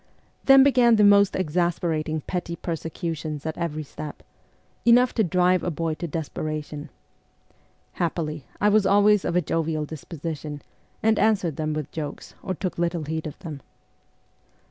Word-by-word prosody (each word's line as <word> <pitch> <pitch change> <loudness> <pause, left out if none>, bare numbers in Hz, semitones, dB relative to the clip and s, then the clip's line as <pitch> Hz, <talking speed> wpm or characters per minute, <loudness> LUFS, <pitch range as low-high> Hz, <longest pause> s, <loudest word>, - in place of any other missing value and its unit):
Then 270 -1 +8
began 250 -4 +5
the 210 - +4
most 200 -1 +6
exasperating 165 -2 -1
petty 175 0 -4
persecutions 160 -2 -4
at 160 - -3
every 155 -3 -3
step 150 +1 -9 0.6
enough 245 +1 +5
to 220 - +2
drive 180 0 +2
a 180 - -1
boy 165 0 -2
to 165 +3 -5
desperation. 155 -1 -5 1.0
Happily, 155 -4 -3
I 205 - +3
was 210 -1 +4
always 205 0 +5
of 170 - -1
a 180 - +4
jovial 160 -1 -1
disposition, 150 -1 -6 0.4
and 220 0 +3
answered 195 -8 +2
them 155 -1 -1
with 155 -2 -4
jokes, 150 -2 -6
or 185 - -3
took 180 -1 -4
little 170 -1 0
heed 160 +1 -3
of 150 - -8
them. 150 -4 -6
165 Hz, 145 wpm, -25 LUFS, 155-190 Hz, 1.0 s, Then